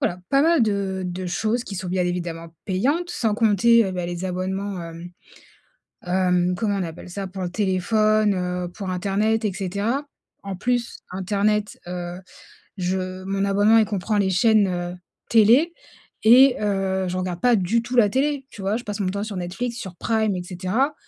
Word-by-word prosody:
voilà! 180 +1 -1
Pas 275 +1 +4
mal 330 -4 +4
de 200 -3 -1
de 180 +1 -4
choses 220 +7 -1
qui 200 - -7
sont, 180 0 -4
bien 180 0 0
évidemment, 170 -2 -4
payantes. 275 - 0
Sans 225 -10 0
compter, 230 +1 +4
heu, 190 - -3
bah, 180 -1 -3
les 175 +1 -4
abonnements, 190 +1 -3
hem, 170 +1 -8 1.0
hem, 180 0 +1
comment 205 +1 -1
on 190 - -1
appelle 170 +1 -8
ça? 195 +2 -5
Pour 185 0 -6
le 175 - -2
téléphone, 215 +2 +2
heu, 180 0 -2
pour 190 +2 -6
internet 210 +4 0
et 200 - 0
cetera. 205 +9 -2 0.4
En 195 -1 -5
plus 245 +3 -1
internet, 205 +3 0
heu, 175 0 -5 0.6
je 185 0 -2
mon 195 0 -1
abonnement 205 +3 +4
il 220 - +5
comprend 205 +1 -2
les 195 -2 +2
chaînes, 210 +2 +4
heu, 175 -1 -3 0.4
télé 240 +10 +5 0.5
et 250 +4 +7
heu, 195 -2 0
je 180 - -3
regarde 180 -1 -3
pas 245 -1 +5
du 210 +4 +1
tout 245 +2 -4
la 220 -4 +6
télé, 275 +2 0
tu 200 - -10
vois? 195 +3 0
Je 245 - -10
passe 205 0 -5
mon 190 - 0
temps 200 +2 -3
sur 215 -2 -6
Netflix, 195 +7 -4
sur 190 -6 -7
Prime 220 +1 0
et 180 - -4
cetera. 190 - -1
195 Hz, 185 wpm, -23 LUFS, 180-220 Hz, 1.0 s, et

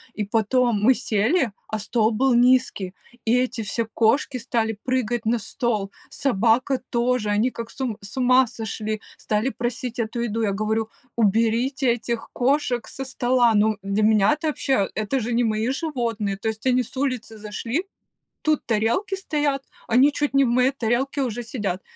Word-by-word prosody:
И 210 - -2
потом 225 +1 +1
мы 255 +5 +5
сели, 235 - +1 0.2
а 220 - -3
стол 220 +1 +1
был 255 +4 +2
низкий, 240 -6 +3 0.3
и 230 +2 +3
эти 250 -1 -1
все 225 +2 -2
кошки 255 +4 +2
стали 225 -2 -1
прыгать 240 -3 -1
на 230 +2 +2
стол, 210 -2 -2 0.2
собака 250 +2 +1
тоже, 240 -2 +1
они 215 +5 +2
как 230 -1 -7
с 275 - -14
ум 240 -5 -2
с 200 +6 -9
ума 255 0 +5
сошли, 220 -1 -4 0.2
стали 215 +4 -1
просить 240 -1 -4
эту 230 +1 -2
еду! 230 -1 -2
Я 210 - +1
говорю: 215 +2 -1 0.3
"Уберите 235 +4 +2
этих 235 -1 -4
кошек 255 -2 +1
со 270 - -6
стола!" 245 -2 +2
Ну, 215 +1 +3
для 200 +2 0
меня 215 +3 +4
это 305 +1 -3
вообще! 265 -8 0
Это 215 +5 -1
же 235 0 -2
не 240 +1 +2
мои 220 +1 0
животные! 235 - -2
То 220 +3 -2
есть 220 +2 -6
они 255 -1 +3
с 255 - -10
улицы 255 -5 -2
зашли, 230 - -3 0.6
тут 310 -1 +1
тарелки 230 - 0
стоят, 295 -7 -1 0.3
они 260 +5 +5
чуть 290 -1 -1
не 275 0 +5
в - - +1
моей 250 +2 +3
тарелке 265 +2 -1
уже 240 -2 -2
сидят. 205 -6 -3
235 Hz, 170 wpm, -23 LUFS, 220-260 Hz, 0.6 s, мы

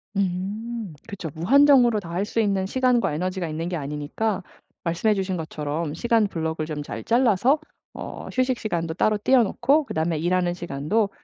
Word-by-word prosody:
음. 200 +2 -2
그쵸. 200 -6 -6
무한정으로 245 - +5
다 170 -4 -9
할 185 +4 -1
수 225 - -2
있는 200 -3 +1
시간과 245 - +2
에너지가 185 +2 -2
있는 160 +2 -3
게 180 - -2
아니니까 150 +8 -2 0.4
말씀해 175 +6 +1
주신 190 -1 -1
것처럼 155 -1 -3
시간 225 +5 +2
block을 160 -3 -3
좀 150 -2 -4
잘 - - -6
잘라서 240 +3 +3 0.3
어 - - -7
휴식 255 -1 +1
시간도 165 -6 -2
따로 215 +4 +2
떼어 245 +4 +4
놓고 275 +8 +2
그다음에 160 -6 -1
일하는 175 +2 +1
시간도 175 +5 -1
190 Hz, 375 characters per minute, -24 LUFS, 165-230 Hz, 0.4 s, 무한정으로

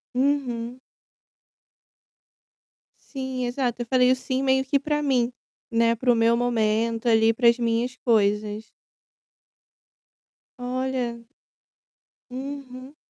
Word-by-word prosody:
Uhum. 255 -3 -1 2.3
Sim, 260 -2 -3
exato. 245 -1 -2
Eu - - -3
falei 250 +1 +3
o - - +4
"sim" 260 +1 -3
meio 265 0 +2
que 275 +1 +1
para 295 +1 -1
mim, 250 -3 +1 0.4
né, 230 0 +3
para 245 +2 +2
o - - +3
meu 230 +1 +3
momento 230 -1 0
ali, 225 0 +4
para 235 +1 +2
as 235 - +2
minhas 235 +2 0
coisas. 210 -1 0 1.9
Olha. 250 -1 -3 1.1
Uhum. 265 +1 -8
245 Hz, 105 wpm, -24 LUFS, 230-260 Hz, 2.3 s, o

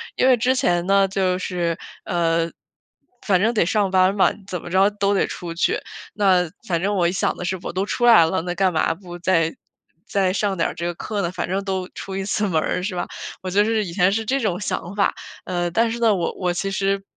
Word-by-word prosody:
因 - - +2
为 255 -2 +5
之 255 +4 +2
前 175 -7 +1
呢 195 0 +4
就 185 -1 0
是， 175 -3 -2 0.3
呃， 165 -1 +1 0.8
反 190 -3 +3
正 230 +3 +2
得 210 - +2
上 200 +1 +1
班 185 +1 +4
嘛， 195 - +4 0.2
怎 180 -3 -4
么 - - -8
着 190 +3 +4
都 205 -1 0
得 195 - +2
出 170 -1 -6
去。 170 - +1 0.4
那 185 -4 +3 0.2
反 170 -5 -1
正 205 +2 0
我 175 -3 +2
一 - - -1
想 185 - 0
的 - - -6
是： 185 +2 -2
“我 - - -5
都 190 +2 -1
出 240 +3 -1
来 225 -9 +8
了， 165 +1 0
那 175 0 -3
干 190 0 +2
嘛 160 -1 +1
不 175 -1 -10
再 165 -2 +2 0.5
再 190 -2 +1
上 200 0 0
点 165 - 0
儿 - - -6
这 170 - -4
个 175 - -2
课 205 +3 -3
呢， 170 - -1
反 180 -1 -4
正 195 +1 0
都 190 -2 -2
出 195 - -7
一 195 - -2
次 210 +1 0
门 160 -4 +1
儿 180 - -1
是 185 0 -3
吧？ 175 - -2 0.4
“我 185 - -3
就 205 +3 +3
是 220 -1 +1
以 175 - -6
前 180 +1 +3
是 225 +1 0
这 265 +5 0
种 210 -5 -1
想 180 -2 -3
法。 200 - +2 0.3
嗯， 175 -1 -2
但 230 0 +2
是 235 - -4
呢， 225 -3 +4
我 170 -3 -1
我 180 -1 0
其 195 +3 -2
实 195 0 0
190 Hz, 260 characters per minute, -22 LUFS, 175-205 Hz, 0.8 s, 来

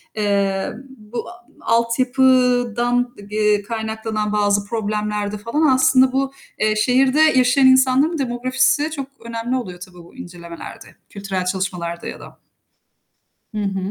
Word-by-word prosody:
eee, 200 -2 0 0.2
bu 215 +2 -7
a 235 0 -15
altyapıdan, 245 0 +2 0.2
eee, 210 -1 +2
kaynaklanan 220 0 -3
bazı 205 -1 +1
problemlerde 210 -1 -3
falan 235 +9 0
aslında 260 0 +4
bu, 270 +1 -1 0.3
eee, 215 0 +2
şehirde 260 +6 +3
yaşayan 260 -3 +4
insanların 260 +5 +4
demografisi 260 +3 0
çok 275 -4 -5 0.2
önemli 230 +2 -3
oluyor 185 -9 -5
tabii 180 0 -12
bu 170 - -18
incelemelerde, 170 -1 -10
kültürel 195 -2 -4
çalışmalarda 180 -2 -3
ya - - -7
da. - - -14 1.2
Hı 215 - -3
hı. 195 -1 -2
230 Hz, 120 wpm, -20 LUFS, 205-255 Hz, 1.2 s, aslında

